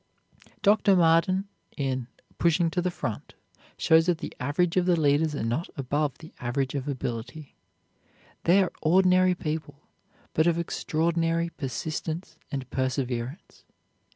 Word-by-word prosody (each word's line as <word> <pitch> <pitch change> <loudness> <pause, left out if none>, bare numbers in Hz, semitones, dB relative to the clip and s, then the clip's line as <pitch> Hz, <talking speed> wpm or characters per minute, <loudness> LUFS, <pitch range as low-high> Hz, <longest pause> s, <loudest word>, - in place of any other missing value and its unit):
Dr. 205 -1 +5
Marden, 175 +3 +3 0.3
in 130 -4 -2 0.3
"Pushing 170 0 +3
to 180 - 0
the 180 - 0
Front," 115 -10 -5 0.4
shows 160 +1 +4
that 175 -2 +2
the 175 - -6
average 165 +6 0
of 180 -1 +2
the 175 -2 +3
leaders 150 +1 +2
are 140 - -3
not 120 +9 -1
above 145 +1 -1
the 160 0 -13
average 130 +2 -1
of 140 -1 -3
ability. 135 +2 -5 0.9
They 190 +3 +5
are 180 - -4
ordinary 185 +2 +4
people, 150 -3 -5 0.5
but 160 +2 +3
of 170 -1 +3
extraordinary 165 0 0
persistence 160 +3 -5
and 135 -3 -4
perseverance. 130 +2 -3
160 Hz, 130 wpm, -27 LUFS, 135-170 Hz, 0.9 s, Dr